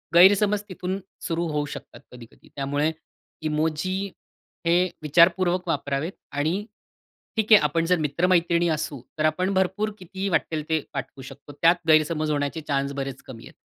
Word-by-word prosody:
गैरसमज 200 +3 +6
तिथून 185 +1 -4 0.3
सुरू 170 +1 -1
होऊ 150 -1 -1
शकतात - - -10
कधी-कधी. 120 -2 -15
तर - - -24
त्यामुळे 145 +3 0 0.6
इमोजी 160 +4 -1 0.7
हे 170 +1 +5 0.2
विचारपूर्वक 175 +4 +3
वापरावेत 145 +1 -1 0.2
आणि 145 +3 0 0.8
ठीक 220 0 0
आहे 210 - +9
आपण 165 +3 +1
जर 180 +1 +3
मित्रमैत्रिणी 170 +2 +2
असू, 150 -4 -5 0.2
तर 155 - +2
आपण 185 +5 +1
भरपूर 190 +3 0
कितीही 190 +2 -4
वाट्टेल 160 -3 0
ते 160 0 +2
पाठवू 135 -1 -6
शकतो. 140 +2 -12
त्यात 170 0 +3
गैरसमज 155 0 +3
होण्याचे 145 +2 -1
चान्स 140 -1 0
बरेच 135 -1 -6
कमी 115 -3 -10
आहेत. - - -16
165 Hz, 150 wpm, -25 LUFS, 145-180 Hz, 0.8 s, आहे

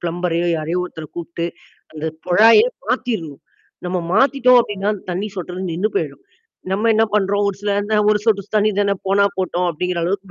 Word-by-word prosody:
பிளம்பரையோ, 175 0 -1
யாரயோ 165 +4 -2
ஒருத்தர 160 -3 -8
கூப்பிட்டு 170 0 -4 0.5
அந்த 155 0 -7 0.2
குழாயே 225 - +6 0.2
மாத்திருணும். 165 - -2 0.5
நம்ம 180 0 -1
மாத்திட்டோம் 250 +2 +5
அப்டின்னா 205 -2 -2 0.2
தண்ணீ 195 +4 -2
சொட்டுறது 180 +1 -5
நின்னு 185 +6 0
போயிடும். - - -3 0.5
நம்ம 210 +4 +1
என்ன 220 +1 +4
பண்றோம். 205 0 +1
ஒரு 195 - -3
சில 205 0 -1 0.2
நேர 215 - +3
ஒரு 210 - +3
சொட்டுஸ் 205 -2 0
தண்ணீ 215 +1 +3
தான 200 -1 +2
போனா 200 +1 +4
போட்டோம் 180 -1 0
அப்படிங்கிற 180 +2 -2
அளவுக்கு 190 +1 -3
190 Hz, 165 wpm, -19 LUFS, 175-210 Hz, 0.5 s, குழாயே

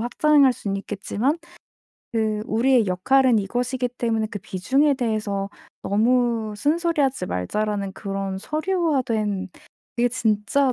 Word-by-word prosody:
확장할 280 +3 +4
순 200 -5 -4
있겠지만 205 - -2 0.8
그 215 -2 0
'우리의 235 0 +3
역할은 250 +7 +3
이것이기 245 +5 -1
때문에 225 -2 0
그 205 - -5
비중에 265 +10 +1
대해서 215 -5 -2 0.3
너무 230 +1 +1
쓴소리 330 +6 +1
하지 265 -9 0
말자.'라는 200 - -2
그런 195 -1 -4
서류화된 260 - -1 0.5
그게 240 +1 +3
진짜 235 +3 +1
225 Hz, 280 characters per minute, -23 LUFS, 205-265 Hz, 0.8 s, 확장할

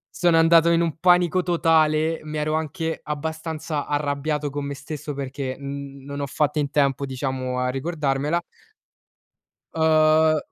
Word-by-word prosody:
sono 175 -2 +3
andato 165 0 +5
in 170 0 +3
un 165 -2 -1
panico 180 0 +4
totale, 160 -2 +2
mi 155 0 -6
ero 155 +1 -1
anche 160 +1 -2
abbastanza 160 0 -4
arrabbiato 145 0 -1
con 145 0 -4
me 140 0 -4
stesso 145 +1 -7
perché 135 -1 -4
n 140 0 -7
non 140 +1 -6
ho 140 - -2
fatto 150 +2 0
in 140 -1 0
tempo 140 -1 +1
diciamo 130 -1 -3
a 125 0 0
ricordarmela. 150 +2 -1 1.3
uhm, 155 0 +4
150 Hz, 145 wpm, -23 LUFS, 140-160 Hz, 1.3 s, andato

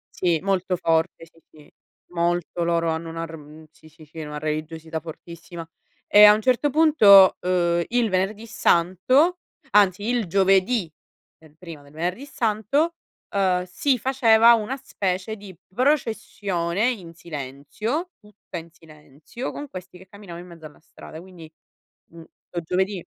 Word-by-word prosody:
Sì, 170 -3 +1
molto 190 -2 -1
forte, 165 -1 -1
sì, 165 0 -24
sì. 150 -2 -19 0.4
Molto, 175 0 -1
loro 170 -1 0
hanno 160 +1 -4
una 165 0 -5
r 165 - -10
uhm, 155 +1 -13
sì, 155 - -20
sì, 160 0 -17
sì, 155 +2 -15
una 150 -1 -7
religiosità 155 +1 -5
fortissima. 170 +1 -10 0.4
E 210 0 +7
a 210 0 +9
un 215 - -3
certo 255 +4 +2
punto, 255 -11 +6
uhm, 175 -1 +1
il 235 -3 0
Venerdì 195 +4 -2
Santo 245 - +2 0.3
anzi 200 -1 +3
il 240 -4 0
giovedì, 190 0 +2 0.5
è 160 -1 -19
prima 165 -4 -11
del 145 0 -19
Venerdì 180 - -4
Santo, 260 +7 -1 0.4
uhm, 185 -2 +1
si 255 +9 0
faceva 235 -2 +5
una 230 +3 0
specie 195 -6 -3
di 195 -4 -13 0.2
processione 215 - -1
in 180 -9 -8
silenzio, 165 - -5
tutta 210 -4 -11
in 165 0 -10
silenzio, 155 - -10
con 290 -1 -8
questi 185 -1 -10
che 190 +1 -15
camminavano 180 -4 -11
in 180 - -15
mezzo 160 -2 -12
alla 150 - -16
strada. 160 +1 -13
Quindi, 175 -4 -14 0.6
mhmm, 170 - -13 0.3
uhm, 175 - -3
giovedì 190 +2 -2
180 Hz, 150 wpm, -23 LUFS, 165-215 Hz, 0.6 s, a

